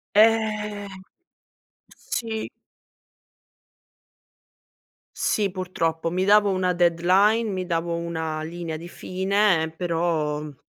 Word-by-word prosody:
Eh. 215 -1 +2 1.1
Sì. 220 -2 -4 2.7
Sì 205 -2 +1
purtroppo. 165 -3 -2
Mi 185 +2 0
davo 205 +1 +5
una 185 -1 +1
deadline, 185 +6 +3
mi 185 -2 -3
davo 170 -1 -1
una 160 -2 -3
linea 165 0 -5
di 170 +2 -9
fine, 190 0 +1
ehm, 160 - -5
però, 165 -4 -1
mhmm, 150 -1 -8
180 Hz, 95 wpm, -24 LUFS, 165-205 Hz, 2.7 s, davo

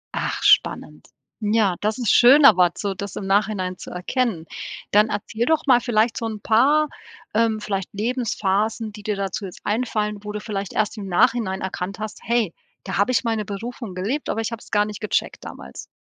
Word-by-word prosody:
Ach - - -2
spannend. - - +2 0.3
Ja, 210 -3 +2
das 215 +1 0
ist 240 -5 +2
schön, 275 +4 +7
aber 180 -7 +7
so, 200 -2 -2
das 200 0 -7
im 195 - -4
Nachhinein 195 -2 0
zu - - -9
erkennen. 180 -1 -2 0.5
Dann 210 +2 +4
erzähl 225 +3 -2
doch 315 +1 +1
mal 245 -3 +5
vielleicht 225 -1 +1
so 230 - -3
'n 215 -1 -5
paar, 280 +9 +3 0.5
ähm, 220 -1 +2
vielleicht 195 -3 -3
Lebensphasen, 220 -1 -1
die 210 - -10
dir 210 -1 -1
dazu 195 +1 -3
jetzt 180 - -9
einfallen, 210 -2 -1
wo 210 - -5
du 210 - -4
vielleicht 200 -3 -4
erst 215 +1 0
im 200 -2 -6
Nachhinein 215 -1 +2
erkannt 190 0 -4
hast: 215 0 -6
„Hey, 230 -7 0 0.3
da 190 - -4
habe 200 +5 +2
ich 225 -5 +1
meine 225 -2 0
Berufung 220 +1 -6
gelebt, 230 +11 -2
aber - - -1
ich 225 +1 -3
hab's 230 - -9
gar 205 0 +3
nicht 210 -1 -7
gecheckt 215 - -2
damals.“ - - -9
215 Hz, 190 wpm, -22 LUFS, 200-230 Hz, 0.5 s, schön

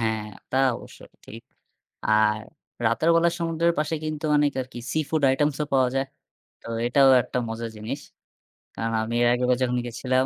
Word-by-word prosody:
হ্যাঁ, 110 -1 0 0.3
তা 130 - -1 0.2
অবশ্যই - - -13 0.2
ঠিক। 115 +2 -11 0.6
আর 110 0 +3 0.5
রাতের 115 +9 +2
বেলা 170 +1 +4
সমুদ্রের 165 0 +1
পাশে 155 +1 0
কিন্তু 155 0 -4
অনেক 145 -1 +3
আরকি 125 -1 -7
seafood 155 0 -1
items 145 +1 +1
ও - - +1
পাওয়া 130 -2 +4
যায়। 135 0 0 0.5
তো - - -15 0.2
এটাও 135 +2 +5
একটা 125 - -4
মজার 115 0 -4
জিনিস। 115 +7 -5 0.8
কারণ 115 0 -2
আমি 115 +1 -3
এর 120 - +4
আগেরবার 125 0 +1
যখন 125 0 0
গিয়েছিলাম 130 +2 0
130 Hz, 165 wpm, -25 LUFS, 115-150 Hz, 0.8 s, এটাও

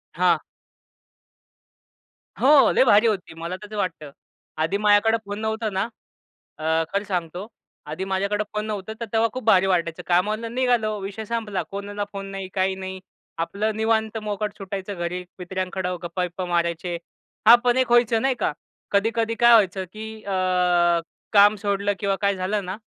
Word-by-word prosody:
हां. - - +3 2.0
हो. 275 -3 +6
लय - - +4
भारी 220 -1 +5
होती, 195 -7 -2
मला 170 +2 -5
तर 210 +1 -9
वाटतं. 165 -7 -3 0.5
आधी 165 +5 0
माझ्याकडं 210 +2 +4
फोन 205 +1 -5
नव्हता 220 0 -1
ना. 190 -1 -1 0.8
अ, - - -9 0.3
खरं 200 +1 0
सांगतो. 180 -1 -3 0.4
आधी 155 +5 -4
माझ्याकडं 200 +2 -1
फोन 210 0 -1
नव्हतं, 210 -1 -4
तर - - -2
तेव्हा 225 0 +3
खूप 255 - -6
भारी 195 -4 +5
वाटायचं. 170 -3 0
कामाला 210 +6 +1
निघालो 235 -3 +1
विषय 200 +3 -6
संपला. 220 -3 -2
कोणाला 205 +1 -4
फोन 195 -1 -6
नाही, 195 -1 -6
काही 190 0 +1
नाही 190 0 -7 0.4
आपलं 210 +5 -1
निवांत 220 0 0
मोकाट 210 0 -3
सुटायचं 195 0 -5
घरी, 175 +1 -3 0.2
मित्रांकडं 185 0 -3
गप्पा-बिप्पा 180 +1 -3
मारायचे. 170 0 -1 0.5
हां, 235 - +11
पण 245 0 +3
एक 255 -2 +1
व्हायचं 240 -2 +4
नाही 270 -1 +2
का. 205 - 0 0.4
कधी-कधी 225 +2 +1
काय 240 0 +7
व्हायचं, 195 -4 +4
की 220 0 -8
अ, 200 - -5 1.0
काम 205 0 +6
सोडलं 200 0 0
किंवा 200 -2 0
काय 200 -1 +2
झालं 195 +2 -2
ना, 185 +2 -4
200 Hz, 155 wpm, -23 LUFS, 185-220 Hz, 2.0 s, हां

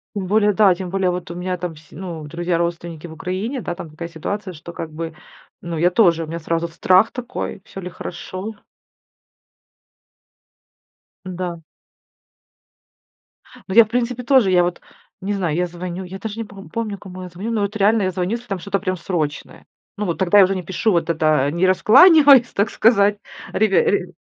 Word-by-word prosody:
Тем 195 -2 -3
более, 210 +1 +3
да, 200 -2 +5
тем 180 0 -6
более, 195 -2 +1
вот 180 -1 -5
у 170 - -6
меня 180 0 -3
там 170 -2 -5
с 155 0 -18
ну, 170 -2 -7
друзья, 170 +3 -2
родственники 170 -1 -3
в 165 - -9
Украине, 190 - -4
да, 175 - -4
там 170 - -8
такая 160 +2 -7
ситуация, 185 +4 -5
что 165 +2 -10
как 165 - -6
бы, 160 +1 -6 0.5
ну, 170 -2 -5
я 175 +3 +3
тоже, 170 -6 +3
у - - -7
меня 165 +2 -5
сразу 165 +1 -2
страх 185 +5 +3
такой. 245 -5 -5
Всё 195 - -9
ли 180 - -6
хорошо? 185 +4 -7 2.7
Да. 180 -2 -5 2.1
Ну, 190 - -3
я, 230 - +10
в - - -16
принципе, 245 +1 -2
тоже. 245 -7 +4
Я 180 -1 +5
вот 175 0 -3 0.4
не 205 +2 -2
знаю, 175 -6 -1
я 180 - +1
звоню, 175 +1 -6
я 190 +2 -8
даже 220 +1 -6
не 225 - -2
пом 195 -1 -12
помню, 220 -3 -3
кому 185 -1 -10
я 180 - -8
звоню, 190 +6 -6
но 215 -3 +1
это 210 +1 -6
реально 210 +1 +3
я 185 - 0
звоню, 180 +2 -2
если 235 +1 -4
там 195 -3 -3
что-то 200 +1 -2
прям 185 -1 -2
срочное. 160 -4 -4 0.3
Ну 210 - -2
вот 170 - -2
тогда 190 +2 +3
я 195 - +9
уже 190 +1 +1
не 185 - -4
пишу 190 +5 0
вот 170 -1 0
это, 155 -3 +2
не 170 +4 +1
раскланиваюсь, 270 - +7
так 200 +1 +1
сказать. 205 -2 +3 0.3
Ребя 210 -3 +3
ре 195 -3 0
185 Hz, 195 wpm, -20 LUFS, 170-205 Hz, 2.7 s, я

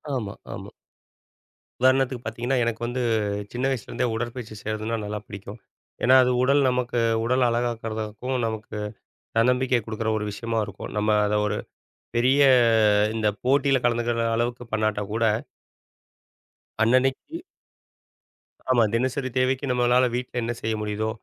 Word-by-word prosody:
ஆமா, 105 -6 -3 0.2
ஆமா. - - -8 1.1
உதாரணத்துக்கு 130 -1 +2
பாத்தீங்கன்னா, 120 +4 -2
எனக்கு 115 -1 -2
வந்து 125 +1 -2 0.5
சின்ன 125 +2 -1
வயசுலேருந்தே 125 0 -2
உடற்பயிற்சி 120 -1 -5
செய்யறதுனா 110 +1 -3
நல்லா 105 +1 -4
பிடிக்கும். 100 +2 -9 0.4
ஏன்னா 130 +2 +6
அது 125 - +2
உடல் 140 +2 +4
நமக்கு 125 -1 -1 0.3
உடல் 125 +2 +2
அழகாக்கறதுக்கும் 115 0 -3
நமக்கு 110 -1 -5 0.6
தன்னம்பிக்கை 125 +1 +3
குடுக்குற 110 0 -2
ஒரு 105 - -3
விஷயமா 115 +2 -3
இருக்கும். 100 -1 -8
நம்ம 105 +1 +1 0.2
அத 105 - 0
ஒரு - - -1 0.6
பெரிய 130 +4 +3 0.7
இந்த 110 -1 +1 0.2
போட்டியில 135 +1 +3
கலந்துக்கிற 120 -1 +1
அளவுக்கு 120 +1 -2
பண்ணாட்டா 110 -1 0
கூட 115 +1 0 1.6
அன்னனைக்கு 130 - +1 1.3
ஆமா, 120 -2 +5
தினசரி 130 +3 0
தேவைக்கு 130 +2 +1
நம்மனால 125 +1 +3
வீட்டில 125 0 -3
என்ன 115 - -2
செய்ய 110 0 -1
முடியுதோ, 105 +1 -2
120 Hz, 120 wpm, -25 LUFS, 110-125 Hz, 1.6 s, ஏன்னா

